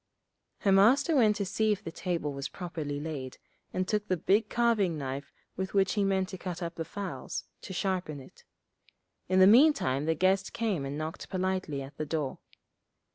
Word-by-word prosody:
Her 200 - +3
Master 255 - +5
went 220 -6 +5
to 200 - -2
see 215 +3 +1
if 205 - -1
the 165 - -5
table 165 -4 -2
was 140 0 -4
properly 160 -6 -5
laid, 145 -4 -5 0.3
and 185 0 -1
took 210 0 -1
the 185 - +1
big 205 +6 +2
carving 220 -8 +2
knife 135 0 -5 0.2
with 190 +2 -4
which 195 -1 +3
he 205 - +1
meant 190 -1 +1
to 190 -3 -7
cut 180 -1 -5
up 170 0 -4
the 165 - -4
fowls, 180 -7 -5 0.2
to - - -8
sharpen 185 -5 -2
it. 130 - -15 0.9
In 185 - +3
the 185 - +8
meantime 215 - +5
the 160 0 +1
guest 185 +4 +1
came 205 -11 -1
and 140 +1 -4
knocked 155 +1 -5
politely 185 -6 -1
at 135 +2 -12
the 155 - -3
door. 150 -3 -2
185 Hz, 185 wpm, -30 LUFS, 155-200 Hz, 0.9 s, the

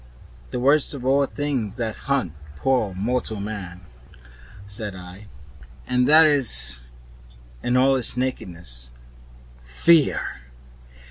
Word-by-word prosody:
"The 125 - -4
worst 145 +3 +3
of 125 -2 -8
all 135 +2 +3
the 140 - +1
things 130 -9 -3
that 115 -3 -2
haunt 135 - 0 0.2
poor 110 - 0
mortal 110 +1 -2
men," 100 -4 -6 0.8
said 100 0 -5
I; 90 +3 -11 0.6
"and 125 0 +1
that 155 +2 +7
is, 60 - +3 0.7
in 120 +1 +1
all 135 +1 +4
its 125 -1 0
nakedness 85 - -4 0.7
'Fear! 100 - +3
115 Hz, 115 wpm, -23 LUFS, 90-135 Hz, 0.8 s, that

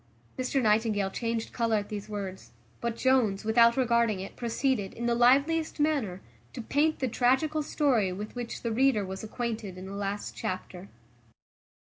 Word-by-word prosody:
Mr 255 +2 0
Nightingale 215 -3 +2
changed 230 +1 -3
colour 230 -2 +1
at 205 -1 -2
these 210 0 -6
words; 195 -3 -6 0.3
but 235 -1 -2
Jones, 230 -6 +2
without 235 +2 +5
regarding 235 -5 +2
it, 195 +1 -7
proceeded, 235 -3 -1
in 235 - -4
the 240 - +2
liveliest 280 +8 +3
manner, 275 -12 0 0.3
to - - -5
paint 305 +6 +1
the 260 - -1
tragical 265 +6 +2
story 260 -10 +1
with 205 +3 -6
which 240 -1 -5
the 230 - -1
reader 240 -3 +2
was 190 +2 -6
acquainted 220 -4 -4
in 185 - -8
the 195 - -7
last 200 0 -4
chapter. 185 0 -5
230 Hz, 160 wpm, -28 LUFS, 205-255 Hz, 0.3 s, without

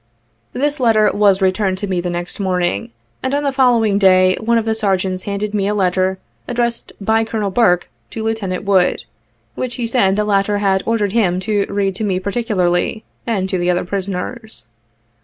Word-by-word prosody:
This 290 +3 -1
letter 225 -4 +4
was 200 -2 +3
returned 190 0 +1
to 205 - -3
me 185 -2 -1
the 180 - -3
next 175 +3 -5
morning, 180 - -1 0.3
and 260 +2 -1
on 290 - -1
the 280 - +1
following 235 -6 +3
day 185 -1 +5
one 235 +1 +1
of 225 - 0
the 225 - +1
sergeants 190 -3 -1
handed 205 +1 -3
me 200 -2 0
a 210 - 0
letter 185 -1 +1 0.3
addressed 235 -1 -2
by 220 +2 +2
Colonel 215 -3 -2
Burke, 180 -5 +3 0.2
to 220 - -5
Lieutenant 215 -5 -2
Wood, 190 -8 +2 0.5
which 250 - -4
he 240 - -3
said 225 -5 +2
the 210 0 0
latter 205 0 +1
had 195 -2 +1
ordered 220 -3 +1
him 190 -5 +1
to 205 0 0
read 200 -1 0
to 220 - -3
me 190 -3 0
particularly, 200 -1 -1 0.2
and 200 -5 0
to 185 - -1
the 175 0 0
other 180 0 +1
prisoners. 195 - -4
200 Hz, 185 wpm, -18 LUFS, 185-225 Hz, 0.5 s, day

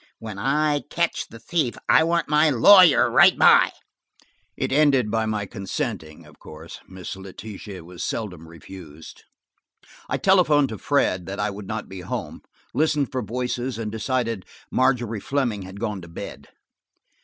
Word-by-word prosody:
When 110 -3 -8
I 145 +5 +1
catch 170 -1 -1
the 115 - -12
thief, 140 0 -2
I - - +5
want 170 +1 0
my 150 +1 +4
lawyer 180 - +7
right - - +6
by." - - +6 0.9
It - - -2
ended 135 -6 +3
by 110 -1 0
my 105 -1 -2
consenting, 100 - -5
of - - -19
course. - - -11
Miss 95 -1 -8
Letitia 95 0 -9
was 85 +1 -8
seldom 90 -8 -5
refused. 80 -2 -13 0.8
I - - 0
telephoned 155 -8 +3
to 110 - -7
Fred 95 -11 0
that 100 +1 -6
I 105 0 -1
would 100 0 -9
not 110 -1 -5
be 95 -1 -9
home, - - -6 0.3
listened 150 -3 +1
for 130 -2 -2
voices 125 +2 -3
and 110 -2 -4
decided 115 -2 -2 0.2
Margery 120 -4 +1
Fleming 120 -3 -2
had 95 +1 -10
gone 105 -4 -3
to 85 - -11
bed. 85 - -9
115 Hz, 155 wpm, -23 LUFS, 95-140 Hz, 0.9 s, lawyer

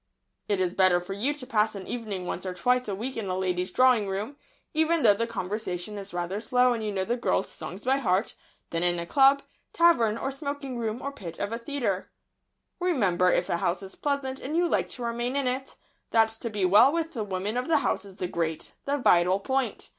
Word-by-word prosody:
"It 200 -2 0
is 180 -1 0
better 185 -2 +4
for 180 +2 -6
you 225 +9 0
to 280 -4 -6
pass 215 -4 +1
an 195 -2 -7
evening 210 -6 -4
once 175 - -4
or 185 -1 -4
twice 250 +4 +1
a 200 - -2
week 245 +6 -5
in 220 -3 -3
a 185 - -1
lady's 180 -1 -1
drawing 245 0 +4
room, 205 +8 -3 0.4
even 320 +1 +2
though 210 -3 +7
the 230 +3 -2
conversation 205 -2 -4
is 200 0 -8
rather 175 +3 -3
slow 250 +2 +3
and 225 -2 -4
you 210 - -2
know 190 -1 -1
the 235 - 0
girl's 235 -5 0
songs 190 +4 -7
by 265 +2 +2
heart, 200 -6 0 0.4
than 165 - 0
in 175 0 +3
a 170 - -3
club, 275 +6 +5 0.3
tavern, 240 -11 +4
or 270 - -3
smoking 275 -2 -5
room, 225 +1 -3
or 280 - -3
pit 175 -12 -8
of 205 +2 -3
a 230 - -3
theatre." 230 -7 -2 0.7
"Remember, 195 - +2
if 175 - +1
a - - 0
house 175 +3 -1
is 190 - -8
pleasant, 280 -2 -2
and 300 +5 -3
you 350 0 +3
like - - 0
to 245 - -6
remain 240 +2 -2
in 280 -1 0
it, 260 +2 -3 0.3
that 225 -1 +4
to 225 +1 -5
be 205 -3 0
well 205 +9 +7
with 330 0 -1
the 235 -8 -3
women 195 +2 -3
of 250 +1 -1
the 325 -2 +4
house - - 0
is 195 -2 -11
the 185 - -3
great, 165 -2 -3
the 285 +1 0
vital 180 -6 +4
point. 265 0 -2
220 Hz, 230 wpm, -27 LUFS, 190-265 Hz, 0.7 s, though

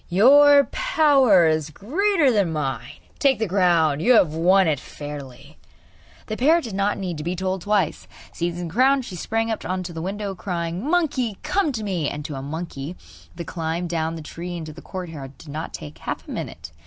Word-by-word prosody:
'Your 280 +9 +7
power 285 - +4
is 155 -1 +1
greater 300 - +1
than 200 -7 +1
mine: 150 -4 -3 0.2
take 275 -3 +3
the 220 - -1
crown; 170 -6 +3
you 240 +10 +4
have 175 -9 +4
won 185 +3 +4
it 150 -4 +1
fairly!' 145 0 -9 0.7
The 215 - -4
parrot 320 +6 +4
did 225 - -6
not 200 +1 0
need 180 -5 -4
to - - -5
be 175 +3 -2
told 185 0 -2
twice. 200 -4 0 0.3
Seizing 175 0 -3
the 165 - -10
crown, 265 +4 +4
she 190 - -8
sprang 225 +6 -1
on 185 -4 -3
to 175 -1 -7
the 160 - -5
window, 200 +2 -3
crying: 175 -1 -4
'Monkey, 270 - 0
come 375 -5 +1
to 220 -3 -4
me!' 180 -8 -1
And 145 0 -6
to 150 - -5
a 135 - -5
monkey, 155 +1 -6 0.4
the 170 0 -6
climb 165 +1 -3
down 165 -1 -2
the 160 - -7
tree 175 +3 -6
into 155 -2 -7
the 170 - -12
courtyard 160 -7 -8
did 165 - -13
not 155 +3 -5
take 75 +1 -9
half - - -5
a - - -8
minute. 80 0 -6
180 Hz, 195 wpm, -23 LUFS, 160-225 Hz, 0.7 s, Your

